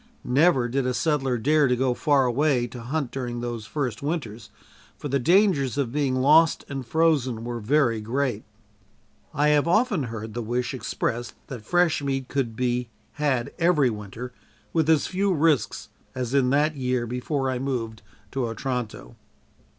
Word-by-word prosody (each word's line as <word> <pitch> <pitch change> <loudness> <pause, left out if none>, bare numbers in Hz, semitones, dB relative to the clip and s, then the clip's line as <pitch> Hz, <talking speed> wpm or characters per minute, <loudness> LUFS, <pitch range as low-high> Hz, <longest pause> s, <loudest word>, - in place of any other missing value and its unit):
Never 135 -1 +3
did 130 +1 -1
a 125 - -1
settler 135 -5 0
dare 150 +5 +3
to 125 - +2
go 130 0 +1
far 140 0 +2
away 125 0 +2
to 120 0 -8
hunt 135 +2 -3
during 120 -3 -4
those 120 -3 -5
first 130 -8 -3
winters, 120 -8 -4 0.5
for 145 - -6
the 140 +1 +1
dangers 165 - +3
of 135 -5 0
being 140 -2 0
lost 150 +5 +4
and 135 -2 -5
frozen 130 -4 +1
were 120 0 -4
very 115 -1 +2
great. 120 0 -1 0.9
I 150 +2 +2
have 150 +1 +3
often 205 - +2
heard 110 -2 -6
the 120 - -3
wish 120 +3 -2
expressed 120 -2 -3
that 125 -4 -6
fresh 175 +3 +2
meat 135 -2 -2
could 130 -5 -2
be 125 0 -1 0.3
had 130 -5 0
every 160 -7 +3
winter, 110 +4 -7 0.4
with 160 -2 +1
as 160 -3 +4
few 195 +1 0
risks 155 -2 +1 0.3
as 125 -1 -3
in 135 -2 +3
that 150 +3 +2
year 125 -3 -1
before 130 +3 -2
I 125 - -2
moved 120 -5 -3 0.3
to 130 -3 -1
Otranto. 115 - -4
130 Hz, 165 wpm, -25 LUFS, 120-150 Hz, 0.9 s, lost